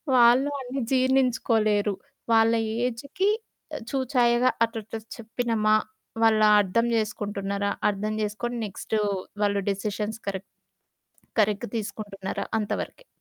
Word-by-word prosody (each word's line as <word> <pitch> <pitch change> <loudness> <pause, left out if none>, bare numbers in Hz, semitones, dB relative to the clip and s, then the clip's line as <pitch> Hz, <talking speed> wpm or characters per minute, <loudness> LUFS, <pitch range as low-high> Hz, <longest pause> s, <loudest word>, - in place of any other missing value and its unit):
వాళ్ళు 245 +3 +6
అన్నీ 260 +1 -4
జీర్ణించుకోలేరు. 245 -5 +2 0.4
వాళ్ళ 225 0 +5 0.3
ఏజికి 280 - -1 0.6
చూచాయగా 250 -2 +3 0.2
అట్లాట్ల 225 -1 -6 0.2
చెప్పినమా, 225 -2 +1 0.5
వాళ్ళ 220 -1 +5 0.2
అర్థం 205 +4 +1
చేసుకుంటున్నారా? 200 -2 -2 0.2
అర్థం 210 +1 -2
చేసుకొని 215 +4 -3
నెక్స్టు 215 +2 -3 0.4
వాళ్ళు 200 -1 +2
డెసిషన్స్ 210 +2 -3
కరెక్ట్, 195 -1 -4 0.9
కరెక్ట్ 210 -1 +1
తీసుకుంటున్నారా 205 -3 -4
అంత 210 - -3
వరకే. - - -11
220 Hz, 95 wpm, -26 LUFS, 205-245 Hz, 0.9 s, వాళ్ళు